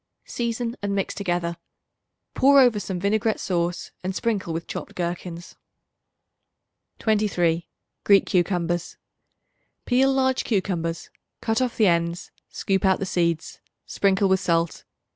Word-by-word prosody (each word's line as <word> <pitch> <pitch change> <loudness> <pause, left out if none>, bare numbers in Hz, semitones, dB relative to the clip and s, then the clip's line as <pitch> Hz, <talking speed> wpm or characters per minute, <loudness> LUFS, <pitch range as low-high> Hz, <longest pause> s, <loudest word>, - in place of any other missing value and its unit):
Season 235 0 -3
and 200 -1 -1
mix 195 - -1
together. 175 -3 -2 0.8
Pour 280 +1 +6
over 245 -5 +5
some 190 -2 -4
vinaigrette 215 +3 +1
sauce, 175 -1 -2
and 185 +1 -3
sprinkle 205 -7 -1
with 165 +1 -4
chopped - - -7
gherkins. 175 0 -5 1.4
23. 180 -6 +1 0.3
Greek 200 -1 +5
Cucumbers. 175 -1 0 0.9
Peel 265 +2 +3
large 260 -1 +1
cucumbers; 175 -6 -2 0.3
cut 225 +2 0
off 250 -2 -1
the 220 - +4
ends; 170 0 0 0.2
scoop 195 -1 -1
out 190 -1 +4
the 195 - -3
seeds; 170 -3 -1 0.3
sprinkle 195 0 +2
with 190 0 +3
salt. 170 -2 0
190 Hz, 125 wpm, -24 LUFS, 170-220 Hz, 1.4 s, Pour